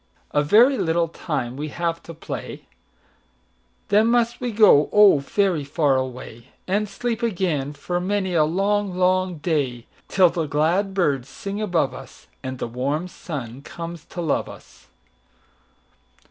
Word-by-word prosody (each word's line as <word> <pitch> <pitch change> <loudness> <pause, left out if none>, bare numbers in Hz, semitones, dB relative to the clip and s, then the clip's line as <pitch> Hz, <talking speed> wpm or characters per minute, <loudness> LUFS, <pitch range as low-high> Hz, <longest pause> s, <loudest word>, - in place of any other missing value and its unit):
"A 145 - +2
very 235 - +5
little 165 0 +1
time 130 -7 -4
we 150 +3 -4
have 170 +2 -3
to 165 - -10
play, 160 - -7 1.2
Then 210 +2 +4
must 240 0 +1
we 245 -1 -2
go, 205 -9 +5
oh, 205 -7 +6
very 175 +2 0
far 140 -1 +1
away, 125 -3 -5 0.2
And 205 +2 0
sleep 235 +3 -3
again 175 - -1
for 175 +4 -3
many 190 0 -1
a 160 -3 +4
long, 195 +4 0
long 185 -1 +1
day, 140 -7 -1 0.2
Till 185 -3 +4
the 165 -2 -2
glad 170 +7 +1
birds 140 -8 0
sing 200 +7 -6
above 175 -9 0
us, - - -12 0.2
And 130 0 -5
the - - -3
warm 140 +8 -2
sun 135 -8 -7
comes 170 +1 -8
to 175 - -6
love 160 -4 -1
us. - - -15
170 Hz, 145 wpm, -23 LUFS, 145-200 Hz, 1.2 s, oh